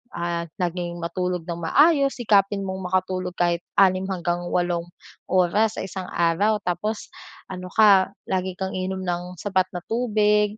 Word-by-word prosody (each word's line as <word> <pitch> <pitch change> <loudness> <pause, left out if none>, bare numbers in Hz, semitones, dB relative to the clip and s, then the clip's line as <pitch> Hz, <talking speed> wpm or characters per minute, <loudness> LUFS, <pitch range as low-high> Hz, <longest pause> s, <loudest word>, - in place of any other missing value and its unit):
Ah, 170 0 -2
naging 175 0 -2
matulog 180 0 -2
nang 170 0 -4
maayos, 280 - +4
sikapin 200 -3 +2
mong 190 -1 -4
makatulog 185 -1 -1
kahit 175 0 +1 0.2
6 190 -1 +4
hanggang 175 -1 -2
walong 175 -1 0 0.4
oras 190 +4 +2
sa - - -2
isang 190 -1 -6
araw. 175 +6 +2
Tapos 195 +5 -2 0.4
ano 180 -1 -6
ka 200 -4 +6 0.2
lagi 185 -1 -1
kang 190 0 -3
iinom 185 0 -3
ng 180 +1 -3
sapat 190 -1 +1
na 175 - -3
tubig, 210 -2 +2
185 Hz, 150 wpm, -24 LUFS, 175-205 Hz, 0.4 s, ka